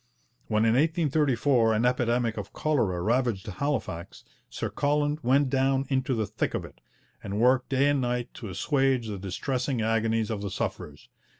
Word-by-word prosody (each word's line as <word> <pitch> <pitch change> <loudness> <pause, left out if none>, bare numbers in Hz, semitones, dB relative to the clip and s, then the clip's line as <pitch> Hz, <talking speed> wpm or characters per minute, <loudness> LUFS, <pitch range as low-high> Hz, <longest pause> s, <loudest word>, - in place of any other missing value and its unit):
When 110 0 +2
in 115 - +4
1834 140 -5 +2
an 110 +3 +1
epidemic 120 -2 +1
of - - -7
cholera 110 -13 0
ravaged 115 -2 0
Halifax, 105 - -4 0.3
Sir - - -4
Colin 145 +1 0
went 130 +2 +2
down 135 0 +2
into 130 -1 0
the 110 -1 0
thick - - -2
of - - -3
it, - - -15 0.4
and 100 +2 -3
worked 125 +2 +3
day 135 +1 +3
and 145 -2 +2
night 120 -1 -2
to 110 - -8
assuage 135 - +1
the 100 -2 -5
distressing 125 +6 -2
agonies 115 0 +1
of 105 -2 -3
the 100 - -3
sufferers. - - -5
125 Hz, 165 wpm, -27 LUFS, 110-135 Hz, 0.4 s, in